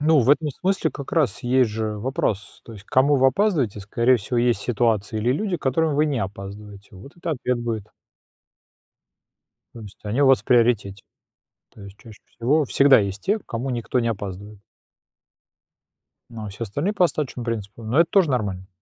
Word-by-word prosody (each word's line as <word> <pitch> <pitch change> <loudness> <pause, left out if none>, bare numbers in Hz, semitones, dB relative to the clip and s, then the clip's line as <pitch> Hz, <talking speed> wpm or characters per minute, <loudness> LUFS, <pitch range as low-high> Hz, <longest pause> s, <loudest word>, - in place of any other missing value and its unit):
Ну, 155 -1 +4
в 125 - +3
этом 150 +1 +2
смысле 185 +2 -1
как 140 - -8
раз 130 - +1
есть 125 -2 +2
же 110 -1 -3
вопрос: 110 -4 -3
то 115 - -11
есть 100 -2 -12
к - - -45
кому 140 +3 +3
вы 135 0 +4
опаздываете. 135 - 0
Скорее 115 +6 +2
всего, 120 +3 -3
есть 120 -3 +2
ситуации 110 -2 0
или 120 +4 +1
люди, 185 +5 -1
к - - -18
которым 150 +3 +1
вы 150 +1 +3
не 140 -5 -1
опаздываете. 100 +1 -8
Вот 120 - -14
это 170 -1 -4
ответ 125 -4 -1
будет. 115 -3 -4 1.9
То 115 - -10
есть 105 -2 -12
они 110 +7 -1
у 140 - +5
вас 135 -1 +5
в - - -37
приоритете. 115 -6 +2 0.7
То 105 - -15
есть 100 0 -12
чаще 110 -2 -15
всего 140 +6 0
всегда 135 0 +5
есть 100 -1 -3
те, 210 +3 +1
к - - -26
кому 120 +3 -4
никто 120 +1 -1
не 115 - 0
опаздывает. 100 -1 -6 1.7
Ну, 110 -2 -8
а - - -6
все 105 +4 -6
остальные 145 - -2
по 180 - +4
остаточному 130 -7 -3
принципу. 115 -1 -5
Ну 110 +6 -1
это 170 0 +4
тоже 190 -7 +3
нормально. 100 -7 -2
120 Hz, 190 wpm, -23 LUFS, 105-140 Hz, 1.9 s, у